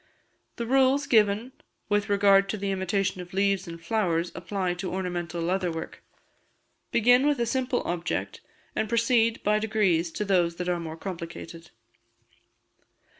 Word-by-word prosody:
The 235 Hz, -, -4 dB
rules 270 Hz, +3 st, +3 dB
given 220 Hz, -1 st, +2 dB, 0.4 s
with 205 Hz, 0 st, 0 dB
regard 200 Hz, -1 st, +4 dB
to 215 Hz, -, -2 dB
the 200 Hz, 0 st, -2 dB
imitation 190 Hz, 0 st, -1 dB
of 180 Hz, +1 st, -11 dB
leaves 195 Hz, -1 st, +1 dB
and 170 Hz, 0 st, -8 dB
flowers 170 Hz, -2 st, 0 dB
apply 185 Hz, 0 st, -2 dB
to 185 Hz, -, -4 dB
ornamental 175 Hz, -2 st, -3 dB
leather 180 Hz, 0 st, 0 dB
work. 160 Hz, 0 st, -7 dB, 0.9 s
Begin 245 Hz, +4 st, +4 dB
with 290 Hz, -3 st, +1 dB
a 235 Hz, -, +1 dB
simple 255 Hz, +1 st, -1 dB
object, 175 Hz, 0 st, -3 dB, 0.3 s
and 220 Hz, -, -1 dB
proceed 230 Hz, 0 st, +2 dB
by 210 Hz, +1 st, +2 dB
degrees 205 Hz, -6 st, +1 dB
to 210 Hz, -, -2 dB
those 175 Hz, -4 st, +2 dB
that 180 Hz, +1 st, -4 dB
are 175 Hz, -1 st, 0 dB
more 160 Hz, -1 st, -6 dB
complicated. 170 Hz, -2 st, -8 dB
195 Hz, 145 wpm, -27 LUFS, 175-220 Hz, 0.9 s, regard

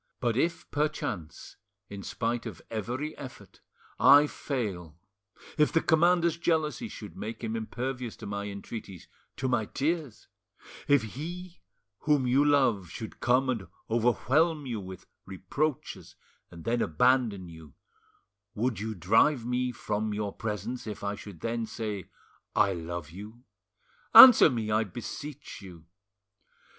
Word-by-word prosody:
But 120 Hz, -3 st, 0 dB
if 165 Hz, +5 st, -1 dB
perchance, 145 Hz, -, -3 dB, 0.3 s
in 100 Hz, -1 st, -8 dB
spite 115 Hz, +3 st, -3 dB
of -, -, -8 dB
every 125 Hz, +8 st, -3 dB
effort, 130 Hz, -3 st, -11 dB, 0.4 s
I 145 Hz, +1 st, +8 dB
fail, 100 Hz, -, -4 dB, 0.6 s
if 150 Hz, -, +4 dB
the 165 Hz, -, +3 dB
commander's 170 Hz, +1 st, +3 dB
jealousy 165 Hz, +5 st, 0 dB
should 105 Hz, -, -9 dB
make 110 Hz, +3 st, -6 dB
him 115 Hz, 0 st, -2 dB
impervious 125 Hz, +2 st, -4 dB
to -, -, -10 dB
my 100 Hz, 0 st, -4 dB
entreaties—to 100 Hz, +4 st, -8 dB
my 120 Hz, -4 st, +1 dB
tears, 150 Hz, -4 st, -3 dB, 0.6 s
if 145 Hz, -5 st, +4 dB
he 170 Hz, -, -7 dB, 0.4 s
whom 145 Hz, -4 st, +2 dB
you 130 Hz, +3 st, +3 dB
love 125 Hz, -, +2 dB
should 110 Hz, +6 st, -8 dB
come 125 Hz, +2 st, +2 dB
and 115 Hz, -8 st, -2 dB, 0.2 s
overwhelm 140 Hz, +7 st, +2 dB
you 120 Hz, -4 st, -3 dB
with 95 Hz, -2 st, -9 dB, 0.2 s
reproaches 125 Hz, -, -3 dB, 0.3 s
and 85 Hz, -1 st, -12 dB
then 120 Hz, +1 st, 0 dB
abandon 110 Hz, +1 st, +2 dB
you, 80 Hz, -3 st, -13 dB, 0.8 s
would 115 Hz, -1 st, -1 dB
you 110 Hz, +1 st, -4 dB
drive 115 Hz, -, +3 dB
me 125 Hz, +1 st, -1 dB
from 105 Hz, -2 st, -3 dB
your 105 Hz, -1 st, -3 dB
presence 115 Hz, +3 st, -5 dB
if 105 Hz, -2 st, -6 dB
I 100 Hz, 0 st, -1 dB
should 100 Hz, -4 st, -10 dB
then 115 Hz, 0 st, -2 dB
say, 105 Hz, -5 st, -5 dB, 0.5 s
'I 100 Hz, -, +3 dB
love 85 Hz, -2 st, -6 dB
you'? 105 Hz, +7 st, -11 dB, 0.7 s
Answer 230 Hz, +1 st, +11 dB
me, 110 Hz, -3 st, -2 dB
I 110 Hz, +1 st, +3 dB
beseech 135 Hz, -, -8 dB
you." 90 Hz, -5 st, -12 dB
115 Hz, 130 wpm, -28 LUFS, 100-140 Hz, 0.8 s, Answer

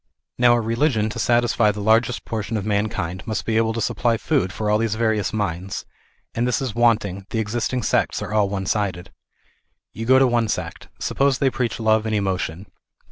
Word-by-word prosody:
Now 120 Hz, -1 st, +6 dB
a 120 Hz, -, +1 dB
religion 115 Hz, -1 st, +1 dB
to -, -, -6 dB
satisfy 120 Hz, -2 st, +3 dB
the 105 Hz, 0 st, -3 dB
largest 115 Hz, +3 st, +2 dB
portion 110 Hz, 0 st, -3 dB
of 100 Hz, -, -4 dB
man 105 Hz, 0 st, +1 dB
kind, 90 Hz, -3 st, -4 dB
must 110 Hz, -, -2 dB
be 110 Hz, -, -1 dB
able 110 Hz, 0 st, +2 dB
to 115 Hz, -, -3 dB
supply 115 Hz, +1 st, +1 dB
food 130 Hz, -8 st, 0 dB
for 105 Hz, +3 st, -4 dB
all 105 Hz, +1 st, +3 dB
these 110 Hz, -2 st, 0 dB
various 110 Hz, -4 st, 0 dB
minds, 95 Hz, -3 st, -3 dB, 0.5 s
and 120 Hz, +2 st, 0 dB
this 125 Hz, -, +1 dB
is 130 Hz, -5 st, -3 dB
wanting, 105 Hz, -5 st, +1 dB
the -, -, -3 dB
existing 115 Hz, +3 st, -1 dB
sects -, -, +1 dB
are -, -, -5 dB
all 105 Hz, -2 st, +2 dB
one 95 Hz, -1 st, -3 dB
sided. 95 Hz, -3 st, -2 dB, 0.8 s
You 115 Hz, +1 st, -6 dB
go 130 Hz, +1 st, +6 dB
to 135 Hz, -, +5 dB
one 120 Hz, -2 st, +1 dB
sect. -, -, -4 dB
Suppose 135 Hz, -2 st, +1 dB
they 135 Hz, -1 st, +2 dB
preach 120 Hz, -3 st, -2 dB
love 110 Hz, 0 st, +2 dB
and 110 Hz, -, 0 dB
emotion. 95 Hz, -3 st, -2 dB
110 Hz, 200 wpm, -22 LUFS, 105-120 Hz, 0.8 s, Now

